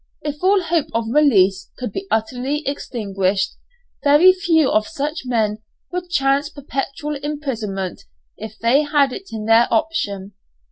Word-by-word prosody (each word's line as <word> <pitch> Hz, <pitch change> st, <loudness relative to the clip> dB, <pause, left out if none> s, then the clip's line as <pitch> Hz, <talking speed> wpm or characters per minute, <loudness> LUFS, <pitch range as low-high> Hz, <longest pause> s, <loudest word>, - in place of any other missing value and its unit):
If 295 Hz, -1 st, -4 dB
all 380 Hz, +1 st, +3 dB
hope 330 Hz, -2 st, 0 dB
of 230 Hz, 0 st, 0 dB
release 195 Hz, -11 st, +3 dB
could 250 Hz, -, -4 dB
be 385 Hz, 0 st, -5 dB
utterly 255 Hz, +6 st, -1 dB
extinguished, 195 Hz, -8 st, -1 dB, 0.5 s
very 295 Hz, +6 st, +7 dB
few 335 Hz, -6 st, +2 dB
of 215 Hz, 0 st, +2 dB
such 300 Hz, -2 st, -4 dB
men 220 Hz, -3 st, 0 dB, 0.3 s
would 360 Hz, 0 st, -4 dB
chance 275 Hz, -2 st, +1 dB
perpetual 285 Hz, +1 st, -4 dB
imprisonment, 240 Hz, -10 st, -4 dB, 0.3 s
if 220 Hz, 0 st, -9 dB
they 235 Hz, +6 st, +3 dB
had 290 Hz, -3 st, +2 dB
it 390 Hz, -, -8 dB
in 220 Hz, -1 st, -5 dB
their 225 Hz, +2 st, +5 dB
option. 205 Hz, -, -1 dB
275 Hz, 140 wpm, -20 LUFS, 220-300 Hz, 0.5 s, very